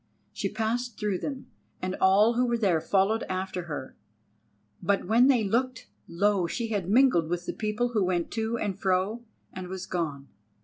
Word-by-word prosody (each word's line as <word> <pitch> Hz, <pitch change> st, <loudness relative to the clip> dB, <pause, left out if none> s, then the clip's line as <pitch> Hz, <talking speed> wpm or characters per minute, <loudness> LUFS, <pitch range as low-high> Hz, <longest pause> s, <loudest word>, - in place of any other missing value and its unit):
She 195 Hz, -, -2 dB
passed 225 Hz, +3 st, -2 dB
through 205 Hz, -4 st, -1 dB
them, 275 Hz, -2 st, -5 dB, 0.3 s
and 185 Hz, 0 st, -3 dB
all 200 Hz, +5 st, +5 dB
who 250 Hz, +1 st, +1 dB
were 235 Hz, 0 st, +1 dB
there 185 Hz, -8 st, +2 dB
followed 200 Hz, +5 st, +2 dB
after 185 Hz, -1 st, -3 dB
her. 145 Hz, -5 st, -6 dB, 0.9 s
But 200 Hz, +2 st, +1 dB
when 235 Hz, +4 st, +5 dB
they 250 Hz, -5 st, +4 dB
looked, 240 Hz, +4 st, -1 dB, 0.2 s
lo! 190 Hz, +1 st, +1 dB
she 230 Hz, +6 st, -3 dB
had 200 Hz, -5 st, -2 dB
mingled 220 Hz, -8 st, +4 dB
with 175 Hz, 0 st, -2 dB
the -, -, -3 dB
people 215 Hz, +3 st, -1 dB
who 220 Hz, -4 st, +1 dB
went 180 Hz, -2 st, -1 dB
to 225 Hz, +1 st, -1 dB
and 200 Hz, -3 st, -3 dB
fro 195 Hz, +5 st, 0 dB, 0.3 s
and 185 Hz, -1 st, -6 dB
was 190 Hz, 0 st, -6 dB
gone. 150 Hz, -7 st, -3 dB
200 Hz, 175 wpm, -27 LUFS, 185-230 Hz, 0.9 s, all